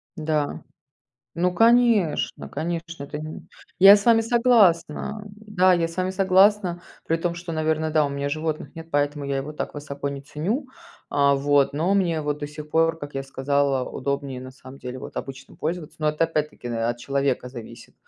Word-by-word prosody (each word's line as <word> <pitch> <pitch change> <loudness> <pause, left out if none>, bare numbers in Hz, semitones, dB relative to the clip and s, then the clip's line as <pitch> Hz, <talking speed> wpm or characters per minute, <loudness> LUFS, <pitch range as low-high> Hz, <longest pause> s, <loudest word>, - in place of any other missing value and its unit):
Да. 155 -2 -2 0.7
Ну, 180 +2 +1
конечно 230 -5 +3
конечно, 165 -1 -4
вот 145 - -14
именно. 155 +1 -6 0.4
Я 195 +2 +10
с 205 - -4
вами 230 -1 +5
согласна, 215 -5 +2
да, 200 -3 +1
я 170 -2 +2
с 165 - -12
вами 185 0 0
согласна, 190 -1 +3 0.2
при 165 - +1
том 170 +1 -2
что, 175 -1 -7
наверно, 155 0 0
да, 155 -1 +3
у 140 - -2
меня 140 0 -2
животных 155 +2 -3
нет, 165 0 -9
поэтому 145 0 0
я 140 -1 -1
его 140 +3 -5
так - - -4
высоко 140 -1 -5
не 140 -1 -6
ценю, 170 - -3 0.4
а, 140 -1 +3
вот, 140 0 +2
но 170 +7 +1
мне 170 -5 +1
вот 150 0 -2
до 145 - -3
сих 150 +1 -9
пор, 165 0 +2
как 145 -1 -8
я 135 - -2
сказала, 135 0 0
удобнее 140 -1 -3
на 130 - -9
самом 130 0 -13
деле, 125 0 -7
вот, - - -10
обычным 135 0 -7
пользоваться, 165 -1 -4
но 155 0 +2
это 155 +2 +1
опять-таки, 150 -5 -3
э, 115 -1 -2
от 120 0 -1
человека 135 0 -1
зависит. 120 -3 -11
155 Hz, 185 wpm, -24 LUFS, 140-175 Hz, 0.7 s, Я